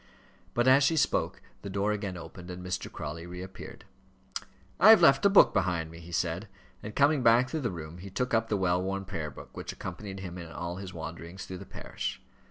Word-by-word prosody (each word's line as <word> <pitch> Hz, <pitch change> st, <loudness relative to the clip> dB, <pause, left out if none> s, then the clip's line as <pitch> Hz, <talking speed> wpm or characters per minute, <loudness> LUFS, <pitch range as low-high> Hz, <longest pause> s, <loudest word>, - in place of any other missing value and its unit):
But 120 Hz, +1 st, +3 dB
as 135 Hz, +2 st, +7 dB
she 160 Hz, +3 st, +3 dB
spoke -, -, +1 dB, 0.2 s
the 100 Hz, -, -6 dB
door 100 Hz, +2 st, 0 dB
again 100 Hz, -3 st, -3 dB
opened, 85 Hz, +2 st, -10 dB
and 90 Hz, 0 st, -7 dB
Mr. 90 Hz, -, -3 dB
Crawley 80 Hz, +3 st, -6 dB
reappeared. 90 Hz, +2 st, -9 dB, 0.9 s
"I 210 Hz, -, +8 dB
have 220 Hz, -2 st, +10 dB
left 135 Hz, -4 st, +6 dB
a -, -, +4 dB
book 200 Hz, -, +7 dB
behind 85 Hz, -4 st, 0 dB
me," 85 Hz, -, -10 dB
he 85 Hz, +1 st, -11 dB
said; 85 Hz, 0 st, -1 dB, 0.3 s
and, 105 Hz, +1 st, -7 dB
coming 145 Hz, 0 st, +4 dB
back 120 Hz, +2 st, +5 dB
through 160 Hz, -, -1 dB
the 120 Hz, -, 0 dB
room, 85 Hz, -1 st, -7 dB
he 100 Hz, +2 st, -8 dB
took 125 Hz, +6 st, -2 dB
up 115 Hz, 0 st, +2 dB
the 105 Hz, -, +1 dB
well 90 Hz, -1 st, +2 dB
worn 95 Hz, +1 st, -2 dB
prayer 80 Hz, -5 st, -4 dB
book 70 Hz, -, -12 dB
which -, -, -5 dB
accompanied 95 Hz, -2 st, -7 dB
him 90 Hz, -1 st, -6 dB
in 85 Hz, -1 st, -8 dB
all 85 Hz, +3 st, -4 dB
his 95 Hz, -1 st, -7 dB
wanderings 85 Hz, +2 st, -7 dB
through 95 Hz, -1 st, -7 dB
the -, -, -10 dB
parish. -, -, -5 dB
95 Hz, 215 wpm, -29 LUFS, 85-115 Hz, 0.9 s, have